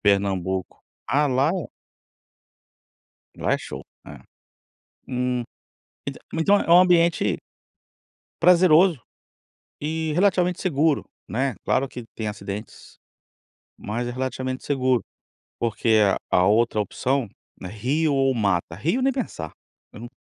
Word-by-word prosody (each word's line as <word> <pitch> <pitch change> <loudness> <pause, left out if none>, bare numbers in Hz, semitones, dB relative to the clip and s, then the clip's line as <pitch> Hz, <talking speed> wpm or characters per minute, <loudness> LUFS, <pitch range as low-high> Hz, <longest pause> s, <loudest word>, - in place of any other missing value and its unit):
Pernambuco. 95 -2 0 0.3
Ah, 145 +2 +3
lá 135 +2 +2
é 180 -3 -3 1.7
lá - - 0
é - - +2
show, - - -8 0.2
é. - - -10 0.9
Hum, 125 -1 -1 0.6
entã - - -5
então 195 +6 +3
é - - -2
é - - -7
um 170 +1 +8
ambiente 170 - +3 1.0
prazeroso 175 -2 +5 0.8
e 160 +1 -2
relativamente 180 -1 +2
seguro, 155 -4 +1 0.2
né. 130 +1 -1
Claro 135 +2 +1
que 125 -2 -8
tem 110 -1 -3
acidentes, 105 +1 -7 0.8
mas 115 +4 -4
é - - -3
relativamente 130 0 -4
seguro, 130 -4 +1 0.6
porque 115 -1 +2 0.3
a - - +4
a 90 - +4
outra 110 +1 +3
opção, 130 +4 -1 0.3
né, 90 - -6
rio 140 - 0
ou 135 -1 +2
mata, 100 -7 0
rio 165 - 0
nem 270 0 +2
pensar. 85 - -4 0.4
Eu 105 - -10
num 120 - -8
130 Hz, 125 wpm, -24 LUFS, 110-160 Hz, 1.7 s, um